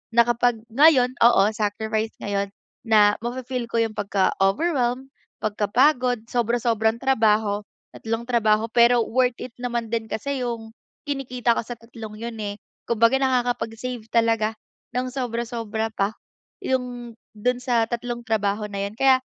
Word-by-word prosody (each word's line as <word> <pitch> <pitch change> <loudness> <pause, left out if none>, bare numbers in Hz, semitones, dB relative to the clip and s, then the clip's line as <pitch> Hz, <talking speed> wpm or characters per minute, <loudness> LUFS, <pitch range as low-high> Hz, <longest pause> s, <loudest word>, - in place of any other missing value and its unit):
na 235 - +7
kapag 240 -1 +1
ngayon, 265 -2 +5
oo, 235 -4 +6
sacrifice 220 +1 -2
ngayon, 200 -1 -1 0.4
na 210 -2 +5
mafe-feel 250 0 -3
ko 230 - 0
'yung 220 -1 -4
pagka-overwhelmed, 240 - 0 0.3
pagkapagod, 245 +3 +2
sobra-sobrang 230 -2 +1
trabaho, 220 -5 +2 0.3
tatlong 225 +1 -3
trabaho, 220 -3 +2
pero 235 +1 +5
worth 250 0 +1
it 250 - -7
naman 240 -2 -2
din 225 -1 0
kasi 275 +4 -3
'yung 230 -2 -5 0.3
kinikita 250 -4 0
ko - - +1
sa 240 - -5
tatlong 225 -2 -10
yun 230 0 -6
eh. 205 -1 -3 0.3
Kumbaga 230 +2 +3
nakakapag-save 245 -2 -1
talaga 225 -1 +2 0.4
nang 255 +1 -1
sobra-sobra 230 -3 -3
pa, 200 +2 0 0.5
'yung 245 -2 -3 0.2
do'n 245 +4 0
sa 235 -3 +2
tatlong 240 0 -4
trabaho 210 -1 -1
na 200 -1 -3
yun - - -14
kaya 265 +2 +5
235 Hz, 135 wpm, -23 LUFS, 220-245 Hz, 0.5 s, na